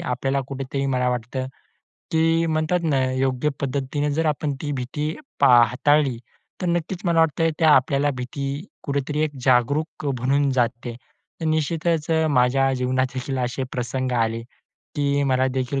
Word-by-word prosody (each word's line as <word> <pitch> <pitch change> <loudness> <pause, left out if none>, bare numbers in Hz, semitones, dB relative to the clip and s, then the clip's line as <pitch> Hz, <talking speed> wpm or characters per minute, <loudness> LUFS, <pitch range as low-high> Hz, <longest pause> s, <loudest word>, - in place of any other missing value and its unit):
आपल्याला 135 +2 -1
कुठेतरी 135 0 -3
मला 125 -2 +1
वाटतं, 125 +2 -3 0.7
ते 165 +1 +3
म्हणतात 155 +2 +1
ना 140 -4 +2
योग्य 130 +2 0
पद्धतीने 140 +2 -1
जर 160 +1 0
आपण 150 -1 0
ती 145 - -2
भीती 150 +4 -3 0.3
पा 140 - +6 0.2
हाताळली, 140 0 +2 0.5
तर - - 0
नक्कीच 170 +1 -1
मला 170 -2 +3
वाटतंय 165 +1 +2
ते 160 - +3
आपल्याला 140 -1 +4
भीती 135 +3 -4 0.4
कुठेतरी 140 +1 -2
एक 155 - -2
जागरूक 145 +5 +1
अ, - - +1
बनवून 140 +2 +2
जाते. 120 -1 -1 0.5
तर 160 - -2
निश्चितच 160 +1 0
अ, 160 0 +3
माझ्या 135 +1 +3
जीवनात 130 +1 +1
देखील 130 +1 -3
असे 125 +1 -2
प्रसंग 125 +1 -2
आले 115 +1 -2 0.5
की, 140 0 +1
मला 130 -1 +2
देखील 130 +1 -1
140 Hz, 150 wpm, -23 LUFS, 130-155 Hz, 0.7 s, पा